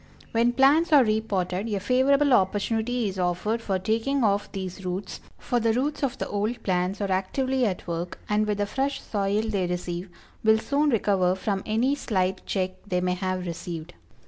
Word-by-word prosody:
When 235 +1 +2
plants 285 +6 +4
are 290 -3 +7
re 215 -1 +1
potted 195 0 -2
a 200 - 0
favorable 265 +5 +3
opportunity 220 +3 +1
is 190 -1 -4
offered 180 +6 0
for 195 -4 -1
taking 230 +7 0
off 205 -1 +1
these 190 -1 -6
roots, 185 +2 -4 0.2
for 245 - -1
the 225 -1 +2
roots 280 +5 -1
of 270 -2 -1
the - - -3
old 215 +4 -2
plants 185 +1 0
are 200 -1 -1
actively 255 +7 0
at 185 -3 -4
work 170 +1 -4
and, 210 0 +1
with 210 -1 0
the 205 - 0
fresh 270 +5 -1
soil 205 0 -1
they 200 -5 -1
receive, 180 +1 -4 0.3
will 220 0 +5
soon 285 +6 +1
recover 195 -6 +2
from 195 0 -2
any 230 +6 +2
slight 190 -9 -1
check 185 -2 0 0.2
they 180 -3 0
may 180 0 0
have 185 0 -2
received. 170 -1 -6
205 Hz, 185 wpm, -26 LUFS, 185-240 Hz, 0.3 s, are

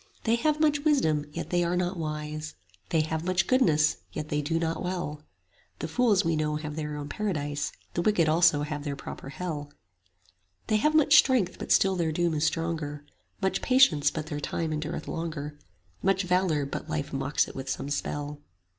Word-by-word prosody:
They 225 - +2
have 305 +3 +1
much 300 -2 +3
wisdom 160 - +2
yet 170 +3 -6
they 175 -1 +2
are 170 +1 0
not 180 +1 0
wise, 155 -1 -4 0.3
They 160 - +3
have 160 +1 -2
much 185 +1 +1
goodness 155 - +3
yet 150 - -5
they 150 0 0
do 165 +3 -1
not 165 0 -1
well, 175 -5 -3 0.6
(The - - -4
fools 205 0 +2
we 165 -1 +2
know 150 0 0
have 150 -1 -5
their 150 -1 -4
own 145 -1 -5
paradise, 145 -7 -2
10 - - -20 0.2
The 175 - 0
wicked 175 -4 +3
also 160 -2 +4
have 150 -1 -4
their 145 -2 -3
proper 135 - -8
Hell); 145 -2 -5 0.9
They 215 - +2
have 305 +8 +2
much 300 -1 +6
strength 245 -9 +2
but - - -5
still 190 -1 +4
their 170 -3 0
doom 170 +1 +1
is 155 +1 +1
stronger, 160 -3 -2 0.4
Much 190 - +1
patience 215 - +5
but 155 +1 -5
their 150 -2 -4
time 155 +2 -2
endureth 150 0 -4
longer, 150 -3 -4 0.4
Much 195 0 +2
valour 180 -5 +1
but 145 +3 -6
life 155 -3 -3
mocks 135 +2 +1
it - - -9
with 135 0 -5
some 140 - -3
spell. 145 0 -3
160 Hz, 190 wpm, -28 LUFS, 150-185 Hz, 0.9 s, much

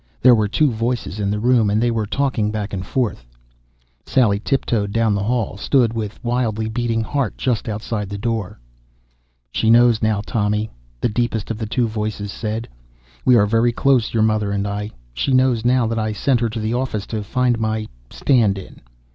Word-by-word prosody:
There 125 0 +7
were 110 -3 +3
two 145 +7 +2
voices 115 -2 -2
in 100 -1 0
the 105 - 0
room, 120 -2 +3
and 105 +1 +2
they 120 +1 +2
were 110 -2 -1
talking 125 -4 0
back 105 -1 -4
and 95 -1 -3
forth. 110 - -2 0.8
Sally 105 -6 +2
tiptoed 115 -4 0
down 115 -1 +2
the 100 - -1
hall, 110 -2 -1
stood 120 +1 +2
with 110 -2 -5
wildly 120 -3 -1
beating 115 0 -1
heart 140 +3 -2
just 120 -3 -1
outside 105 -1 -3
the 100 - -5
door. 110 - -3 0.9
"She 110 - +1
knows 120 -1 +5
now, 110 -2 +1
Tommy," 105 0 -1 0.3
the - - +2
deepest 115 -1 -1
of 110 - -4
the 110 - -3
two 120 +2 0
voices 105 -2 -4
said. 110 +2 -4 0.6
"We 125 - +6
are 105 -3 +5
very 115 +3 +2
close, 125 -1 +2
your 110 -2 +2
mother 110 -2 +1
and 100 0 -1
I. 105 +1 -3 0.2
She 95 - -1
knows 130 -3 +3
now 125 0 +3
that 115 0 -1
I 110 0 -1
sent 125 +3 +1
her 115 -1 0
to 110 +1 -5
the 110 +1 -1
office 120 -5 -2
to 110 -2 -4
find 125 +3 0
my 110 -1 -1 0.2
'stand 115 -8 +2
in.' 95 - -11
110 Hz, 195 wpm, -20 LUFS, 105-120 Hz, 0.9 s, There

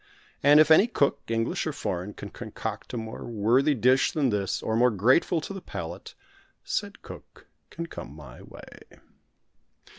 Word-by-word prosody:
And 145 +2 +7
if 155 +1 +5
any 190 +8 +7
cook, 145 -12 +1
English 115 0 -1
or - - -2
foreign, 90 +4 -4
can - - -8
concoct - - -6
a 125 - -4
more 110 0 -6
worthy 120 +6 +2
dish 130 +3 +3
than 140 -6 +1
this, 100 -2 -2
or 110 - -1
more 125 +2 +4
grateful 125 - +2
to 195 - -6
the 195 - -7
palate, 85 - -8 0.5
said - - -4
cook - - -13 0.2
can 170 - -6
come 75 - -9
my 75 - -12
way. - - -14
125 Hz, 160 wpm, -26 LUFS, 105-150 Hz, 0.5 s, And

